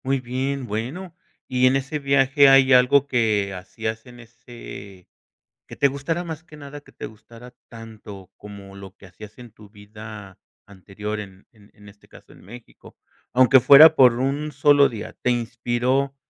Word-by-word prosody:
Muy 135 0 -1
bien, 130 +2 -4
bueno, 130 - -7 0.3
y 130 0 +1
en 130 - +2
ese 140 +3 -4
viaje 140 0 +3
hay 135 0 +5
algo 130 +2 +4
que 110 -6 -1
hacías 110 +5 -7
en 120 0 -15
ese 115 -5 -13 0.6
que - - -11
te 140 - +2
gustara 140 +5 -4
más 160 -2 -8
que 155 -3 -16
nada, 145 0 -11
que - - -21
te - - -9
gustara 115 +3 -16
tanto 110 -4 -13
como 100 -1 -13
lo 95 -1 -13
que 100 - -17
hacías 105 +4 -15
en 120 -1 -13
tu 105 -1 -19
vida 105 -1 -13 0.3
anterior, 105 +2 -8
en 95 -2 -12
en 105 -2 -24
en 105 0 -17
este 100 0 -22
caso - - -19
en - - -20
México, 120 +5 -16 0.4
aunque 130 +1 +5
fuera 150 +5 +7
por 125 -4 +5
un 140 +3 -3
solo 145 0 +3
día. 110 -4 -9
¿Te 125 - +1
inspiró 120 +3 -2
120 Hz, 170 wpm, -21 LUFS, 105-135 Hz, 0.6 s, fuera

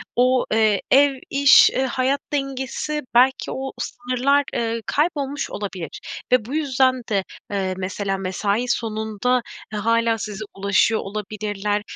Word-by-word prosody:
o, 255 +1 +3
eee, 215 -3 +3
ev, 280 +1 +6 0.2
iş, 280 0 +7
eee, 260 - -1
hayat 260 +2 0
dengesi 275 +2 -2
belki 260 +2 +4
o 265 0 -4
sınırlar, 255 +3 0
ııı, 230 0 -1
kaybolmuş 290 -3 -1
olabilir. 190 -4 -6 0.3
Ve 250 -4 +4
bu 265 - -5
yüzden 260 -4 +2
de, 195 -3 +1 0.3
eee, 190 -2 -1
mesela 195 +1 -2
mesai 200 +5 -1
sonunda, 220 +1 0 0.3
eee, 210 - -2
hâlâ 230 +1 +2
size 215 -1 -5
ulaşıyor 200 +3 +2
olabilirler. 205 0 -3
230 Hz, 130 wpm, -22 LUFS, 205-265 Hz, 0.3 s, iş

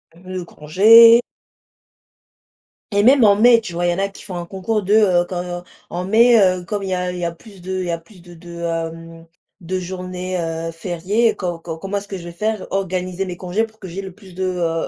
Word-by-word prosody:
L 175 - -19
le 180 - -4
congé 225 +10 +6 1.7
Et 205 0 +2
même 260 0 +6
en 200 -1 +6
mai, 230 +2 +5
tu 185 -6 -8
vois, 175 +1 -1
il 175 - +2
y - - 0
en 185 - -4
a 200 0 0
qui 195 - -14
font 190 - -8
un 170 0 -5
concours 205 +3 -2
de, 200 +2 0
heu, 185 -5 +4
quand, 175 -1 -5 0.3
en 180 +1 -3
mai, 230 +3 +5
heu, 185 -1 +2
comme 205 +1 -3
il 195 - -4
y 185 - 0
a 180 0 -2
il 180 - -6
y - - -4
a 170 - -1
plus 195 +2 -16
de 185 +1 -3
il - - -3
y 170 - -2
a 170 - -2
plus 180 +3 -19
de 175 0 -15
de, 170 +1 -14
hem, 165 0 -5 0.3
de 185 +2 -3
journées, 185 0 -5
heu, 165 0 -4
fériées, 185 +7 0
co 175 -3 -4
comment 175 +5 -5
est-ce 200 0 -6
que 195 - -6
je 170 - -10
vais 170 - -8
faire, 215 +3 -3
organiser 185 -1 -2
mes 175 -1 -6
congés 185 +5 -1
pour 220 -1 -9
que 190 - -9
j'ai 185 +3 -6
le 190 -1 -8
plus 190 -1 -16
de, 190 +1 -4
heu, 170 -3 -1
185 Hz, 240 wpm, -19 LUFS, 175-200 Hz, 1.7 s, congé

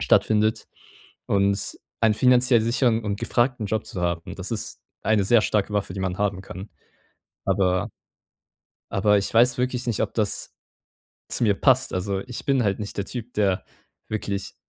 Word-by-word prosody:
stattfindet. 110 0 +2 0.6
Und 100 0 +1 0.2
einen 110 -2 +4
finanziell 125 0 +4
sicheren 115 0 +2
und 100 -1 -2
gefragten 120 -1 0
Job 110 +1 -2
zu 90 - -6
haben, 85 -1 -2
das 95 +3 -6
ist 115 -3 -4 0.2
eine 110 -2 +3
sehr 115 +3 +5
starke 105 -1 0
Waffe, 100 -3 -1
die 95 - -4
man 95 -1 -2
haben 100 -2 -1
kann. 95 +2 -9 0.7
Aber 90 -2 +1 1.0
aber 105 +1 +3
ich 100 - -2
weiß 120 +2 +4
wirklich 125 0 -1
nicht, 115 -4 -1
ob - - -3
das 105 -3 -1 0.8
zu - - -1
mir 105 -3 +4
passt. 130 +4 +3
Also, 95 +1 -1
ich 125 +3 -8
bin 135 -2 +2
halt 100 -3 0
nicht 105 -1 -6
der 100 - -1
Typ, 120 +2 -7
der 100 -3 +1 0.4
wirklich 100 -2 -3
105 Hz, 165 wpm, -24 LUFS, 100-120 Hz, 1.0 s, sehr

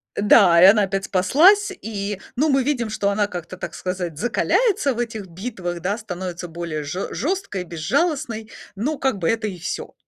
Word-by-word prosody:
Э, - - -2
да, 190 -5 +6
и 185 - +9
она 205 +2 +7
опять 195 0 -2
спаслась, 355 - +4
и, 205 -2 -4 0.2
ну, 300 +5 +2
мы 270 -2 +3
видим, 245 -5 -1
что 205 -2 0
она 205 0 +1
как-то, 180 -1 -7
так - - -6
сказать, 180 -4 -4
закаляется 275 - +1
в 235 - -7
этих 220 -4 -4
битвах, 175 -2 -5
да? 200 +4 -1
Становится 180 -4 -6
более 165 -2 -5
жё 175 +7 -4
жёсткой 310 - -2
и - - -4
безжалостной, 225 - -1 0.3
но, 275 +10 -2
как 265 -7 0
бы, 165 - 0
это 225 -1 0
и 185 -4 -6
всё. 170 - -5
205 Hz, 190 wpm, -22 LUFS, 180-245 Hz, 0.3 s, и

